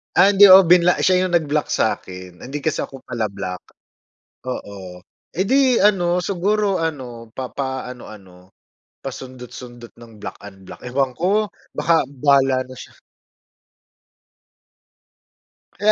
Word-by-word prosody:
Ah, 195 +3 +6
hindi 200 0 +8
ako 190 0 +10
binla 180 0 +6
siya 185 0 +3
yung 180 - -4
nag-block 150 -2 0
sakin. 90 -4 -3
Hindi 140 +3 -6
kasi 155 - -1
ako 135 - -6
pala-block. 100 -6 -5 0.9
Oo, 95 -6 -7 0.3
eh, 185 - -1
'di 260 +2 +3
ano, 180 -4 +3
siguro 200 +1 0
ano, 125 -8 -5
papaano-ano, 125 -9 -7 0.5
pasundot-sundot 125 -2 -10
ng 115 -1 -14
block, - - -7
unblock. 95 -2 -13
Ewan 130 0 -1
ko! 205 +4 +1 0.3
Baka 165 -1 +2
bahala 135 -1 +2
na 130 0 -13
siya! - - -11 2.8
Kaya 210 +2 +3
135 Hz, 115 wpm, -20 LUFS, 115-180 Hz, 2.8 s, ako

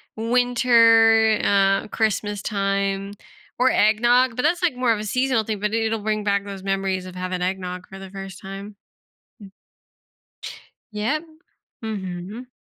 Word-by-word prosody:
winter, 230 -2 +4
uh, 195 -1 +2
Christmas 210 -2 -1
time 195 -1 -1 0.4
or 255 +1 +4
eggnog, 240 +3 +3
but 250 - -2
that's, 345 +4 +1
like, 335 -8 +2
more 250 -1 +1
of 215 - -4
a 210 - -4
seasonal 255 +1 0
thing, 215 -1 -4
but 210 +1 -2
it'll 225 0 0
bring 215 0 -2
back 200 -1 0
those 195 -1 -8
memories 195 -1 -1
of 185 -1 -10
having 185 0 -4
eggnog 180 0 -4
for 195 - -11
the 195 0 -9
first 195 -1 -9
time. 195 +2 -8 2.2
Yep. 235 +10 -2 0.6
Mhm. 200 +2 -6
210 Hz, 140 wpm, -22 LUFS, 195-230 Hz, 2.2 s, winter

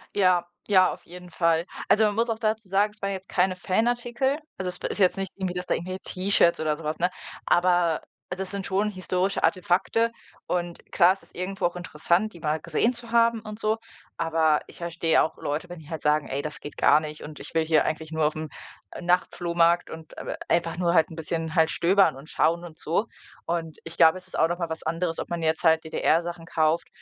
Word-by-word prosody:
Ja, 185 -3 +3 0.2
ja, 185 -3 +5
auf - - -10
jeden 180 0 -11
Fall. 165 -1 +2 0.2
Also, 220 - +5
man 205 -1 +1
muss 230 +2 +1
auch 225 - -1
dazu 220 -2 -1
sagen, 200 +3 +2
es 210 - -20
waren 200 - -1
jetzt 190 0 -8
keine 185 0 +2
Fanartikel, 240 +8 0 0.2
also, 190 - -3
es 180 - -5
ist - - -3
jetzt 185 0 +4
nicht 195 -1 -3
irgendwie, 190 -2 -3
dass 180 0 -4
da - - +1
irgendwie 185 +2 -5
T-Shirts 185 -3 +2
oder 155 -1 0
so 165 - -11
was, 155 +1 -3
ne 180 - +2 0.4
aber 175 -2 +3 0.3
das 185 +1 -4
sind 200 -1 -4
schon 200 +2 0
historische 185 0 -1
Artefakte 190 +5 +2 0.4
und 175 -1 -3
klar, 175 +1 +6
es 195 - -4
ist - - -20
irgendwo 185 +1 -3
auch 175 - 0
interessant, 175 +4 0
die 170 - -12
mal 155 0 -1
gesehen 170 +9 +1
zu 235 -1 -7
haben 230 -1 +3
und 215 0 -8
so, 215 0 +1 0.4
aber 160 -2 +2
ich - - -14
verstehe 170 -1 +1
auch 160 - -1
Leute, 150 +4 -3
wenn 175 -1 -8
die 155 -1 -14
halt 160 -2 -5
sagen: 150 -1 +2
„Ey, 135 +1 -2
das 150 +2 -6
geht 145 - -9
gar - - +5
nicht 155 -1 -7
und 150 0 -9
ich - - -9
will 160 -1 +2
hier 160 -1 +4
eigentlich 160 0 -3
nur 160 -1 +1
auf'm 155 +1 -2 0.5
Nachtflohmarkt 175 -1 +2
und, 160 -1 -10
äh, - - -5
einfach 170 0 +1
nur 170 -1 +1
halt 160 -3 +4
'n 160 - -9
bisschen 160 0 -3
halt 160 -1 +4
stöbern 190 -2 +3
und 140 +4 -12
schauen 170 +2 +1
und 160 -2 -12
so.“ 175 +8 0 0.4
Und 165 -2 -3
ich 165 0 -8
glaube, 165 +1 +6
es 185 - -12
ist - - -7
auch 160 - +5
noch 175 +1 -3
mal 170 -2 -2
was 160 0 -5
anderes, 165 +1 -2
ob - - -5
man 170 -1 -3
jetzt 160 0 +1
halt 160 -1 +4
DDR 160 +1 +2
Sachen 170 -1 -7
kauft 160 0 +1
175 Hz, 225 wpm, -26 LUFS, 160-190 Hz, 0.5 s, klar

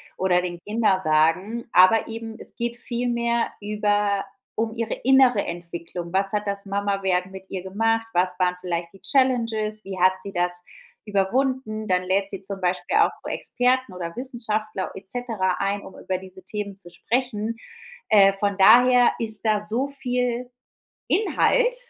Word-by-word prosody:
oder 180 -1 +2
den 175 -1 -5
Kinderwagen, 190 0 +1
aber 185 +5 +6
eben 225 0 -7
es - - -7
geht 235 0 -3
vielmehr 235 -1 0
über 205 -1 0 0.3
um 225 +1 -2
ihre 230 -1 -2
innere 260 -4 +4
Entwicklung. 170 0 -6
Was 195 +1 +2
hat 210 0 -1
das 200 0 -2
Mama 200 0 -1
werden 185 -1 0
mit 190 0 -11
ihr 185 -2 -5
gemacht? 225 +4 0
Was 180 +1 +3
waren 180 -1 +2
vielleicht 170 0 -3
die 195 - -17
Challenges, 230 -5 +1
wie 190 -1 -6
hat 185 +1 +5
sie 200 - -6
das 175 -1 0 0.5
überwunden? 215 +2 0
Dann 185 -1 +2
lädt 195 +2 0
sie 195 0 -7
zum 195 0 -6
Beispiel 180 0 0
auch - - +4
so - - -9
Experten 250 -4 0
oder 170 -2 -6
Wissenschaftler 220 -6 -3
et 190 0 -9
cetera 220 -7 -1
ein, 200 +1 -1
um 190 - -12
über 185 -1 -2
diese 190 -1 -13
Themen 200 0 -5
zu 185 -3 -11
sprechen. 230 -1 -2 0.5
Äh, 195 -2 +6
von 200 0 -1
daher 245 +4 +7
ist 220 -3 -1
da 215 -2 +2
so 225 +6 -2
viel 250 -2 -2 0.6
Inhalt, - - +2
205 Hz, 160 wpm, -24 LUFS, 190-235 Hz, 0.6 s, daher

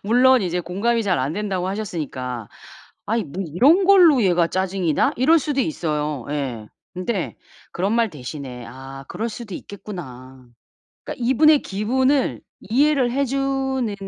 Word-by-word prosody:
물론 250 +4 +5
이제 180 0 -1
공감이 225 +7 0
잘 190 -4 +1
안 135 +4 -1
된다고 190 -2 -2
하셨으니까 140 - -4 0.6
'아 225 +3 0
이 220 - -1
뭐 175 +7 -5
이런 285 - +4
걸로 350 -9 +6
얘가 175 -3 +3
짜증이 185 -3 -1
나?' - - +2
이럴 315 +7 +5
수도 280 -1 -1
있어요. 150 - -2
예. 130 -7 -3 0.3
근데 185 +1 -3 0.4
그런 195 +5 -1
말 230 -3 +2
대신에 130 -3 -8
'아 135 +2 -10
그럴 230 +2 -3
수도 215 -3 -8
있겠구나.' 130 -12 -9 0.6
그러니까 240 - -5
이분의 295 +4 +5
기분을 255 +7 0 0.2
이해를 265 +2 +2
해 275 +2 +1
주는 265 -3 -1
200 Hz, 305 characters per minute, -22 LUFS, -, 0.6 s, 걸로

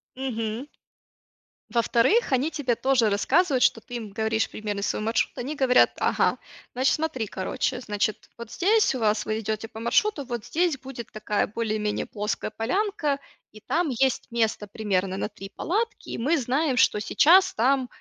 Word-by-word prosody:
Мгм. 235 -1 -3 1.0
Во-вторых, 235 - +2
они 265 +4 +2
тебе 275 -6 -1
тоже 255 -3 +2
рассказывают, 265 - +2
что 225 - +4
ты 245 - -10
им 225 -3 -5
говоришь 220 +2 -1
примерный 210 -2 -4
свой 210 - -1
маршрут. 225 +2 0
Они 275 +5 -4
говорят: 260 -3 +4
"Ага, - - +2 0.4
значит, 260 +2 +2
смотри, 300 -8 -2
короче, 250 +7 -2
значит, 210 -2 -2
вот 235 -1 -8
здесь 420 -3 +3
у - - -3
вас, 215 -1 +1
вы 215 0 -1
идете 220 0 -3
по 220 - -10
маршруту, 285 - +1
вот 240 -3 -4
здесь 325 +1 0
будет 255 -3 -9
такая 215 -1 -1
более-менее 215 -1 -2
плоская 210 +1 -3
полянка, 300 - -1 0.3
и 215 - -14
там 335 +6 0
есть 260 0 0
место 225 -2 0
примерно 195 -3 -1
на 205 - -2
3 195 -2 -10
палатки. 430 +4 -2
И - - -4
мы 295 +7 +1
знаем, 265 +3 0
что 220 -3 +3
сейчас 365 - +5
там, 260 +3 +2
240 Hz, 165 wpm, -25 LUFS, 215-280 Hz, 1.0 s, сейчас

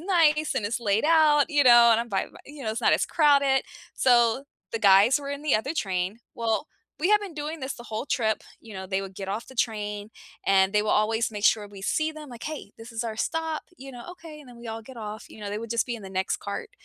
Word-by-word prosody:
nice 310 -5 +2
and 215 - 0
it's 235 +4 -2
laid 210 +2 +1
out," 310 -2 +5
you 290 -2 +4
know, 240 -2 +8
and 225 - +3
I'm 235 - -5
by 195 -3 -1
my - - -16
you 285 -3 -10
know, 220 - -1
it's 220 - -4
not - - +4
as - - +2
crowded, 280 -4 +3 0.3
so, 240 0 +3 0.3
the 230 - -2
guys 205 +8 +6
were 280 - -6
in 285 +1 -5
the 300 -6 +2
other 240 +7 0
train, 190 - -2 0.2
well, 230 +4 -1 0.3
we 355 +6 +1
have 420 0 +5
been 385 -6 -8
doing 305 +1 -5
this 265 +1 -4
the 240 - -11
whole 220 +5 -5
trip, 230 -6 0 0.2
you 225 - -13
know, 190 0 -6
they 190 +1 -1
would 195 -1 -9
get 195 0 -6
off 210 +4 -3
the 260 - -13
train, 210 -2 -2 0.4
and 190 0 +4
they 210 - +3
will 215 - -1
always 220 +2 +1
make 210 -1 -5
sure 210 -1 +3
we 200 -1 -12
see 310 +9 0
them 305 -3 -10
like, 240 -1 -10
"Hey, 300 -10 -6
this 225 +2 -10
is 230 +1 -4
our 220 -1 -4
stop," 320 -1 -2
you 270 0 -10
know, 240 -1 -10
"Okay," 320 -4 -12
and 270 - -15
then 240 - -13
we 235 - -11
all 225 0 -5
get 255 +2 -13
off, 215 0 -7
you - - -14
know, 205 - -5
they 205 - -3
would 230 +1 -7
just 235 - +1
be 240 - -3
in 220 - -9
the 195 - -8
next 190 0 -1
cart, 205 - -6
235 Hz, 270 wpm, -26 LUFS, 210-290 Hz, 0.4 s, know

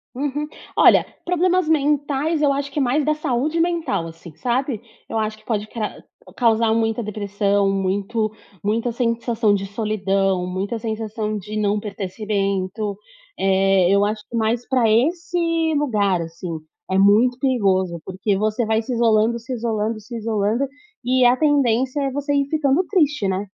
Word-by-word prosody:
Uhum, 290 +2 -2 0.3
olha, - - +6 0.2
problemas 360 -1 +2
mentais 295 +1 +1
eu 285 -2 +4
acho 280 0 -2
que 290 - -2
é - - +2
mais 270 +3 +1
da 305 - +3
saúde 305 +2 -1
mental 330 - 0
assim, 165 -1 -12
sabe. 245 - -1 0.3
Eu 225 - -2
acho 215 0 -2
que 215 - -23
pode 215 -2 -2
cra 215 -2 -5 0.3
causar 230 -2 +3
muita 225 0 0
depressão, 205 -1 0
muito 200 +3 -1 0.3
muita 225 +4 0
sensação 230 -2 0
de 195 -1 -1
solidão, 195 -3 0
muita 195 +5 -3
sensação 215 -1 -3
de 210 +2 -7
não 205 0 +1
pertencimento. 200 0 -3 0.4
Eh, 195 -1 +3
eu 200 0 +4
acho 210 0 -3
que - - -6
mais 230 +2 0
pra 250 -4 +2
esse 335 +10 +1 0.4
lugar, 205 -10 +1
assim, 165 0 -6 0.3
é 190 - +1
muito 215 +6 +4
perigoso, 190 - +1
porque 190 +2 -1
você 215 +3 0
vai 220 +1 +1
se 250 +3 -4
isolando, 230 0 +3
se 230 +3 -6
isolando, 220 -2 -2
se 215 +3 -10
isolando 220 +3 0 0.4
e 255 0 +3
a 245 +1 +5
tendência 270 -2 +2
é 275 - -1
você 285 +2 -2
ir 280 -1 +1
ficando 300 +1 +2
triste, 295 - +2
né. 190 +2 -1
225 Hz, 160 wpm, -21 LUFS, 200-265 Hz, 0.4 s, olha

